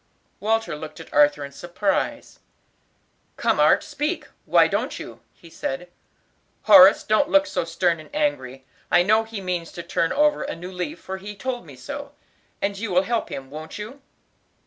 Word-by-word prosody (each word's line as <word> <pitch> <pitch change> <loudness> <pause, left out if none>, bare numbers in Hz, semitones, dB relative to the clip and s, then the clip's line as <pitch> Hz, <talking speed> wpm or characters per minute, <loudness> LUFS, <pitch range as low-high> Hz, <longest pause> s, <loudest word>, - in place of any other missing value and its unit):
Walter 225 -4 0
looked 155 +1 -9
at - - -12
Arthur 145 0 +4
in 140 - -10
surprise. 175 +6 -2 1.0
"Come, - - +1
Art, - - +5
speak, 300 +4 -3 0.2
why - - +5
don't - - -2
you?" - - -9
he 170 - -18
said. 165 +1 -5 0.7
"Horace, 295 +1 +8
don't 285 +2 +2
look 290 0 +5
so 295 - -2
stern 170 0 0
and 155 - -13
angry, 135 - -2 0.2
I 175 - +5
know 215 +4 +3
he 220 -2 -7
means 180 -3 -3
to 170 - -7
turn 165 -1 0
over 300 0 +2
a - - -4
new 180 +2 -8
leaf; 190 - -5
for 190 0 -6
he 205 +2 -8
told 245 -3 -4
me 140 - -11
so. 285 - -8 0.5
And 200 0 -1
you 225 0 -3
will 185 0 +3
help 230 +2 -1
him, 135 0 -7
won't 155 +2 -8
you?" 225 +7 -8
190 Hz, 175 wpm, -23 LUFS, 165-245 Hz, 1.0 s, Horace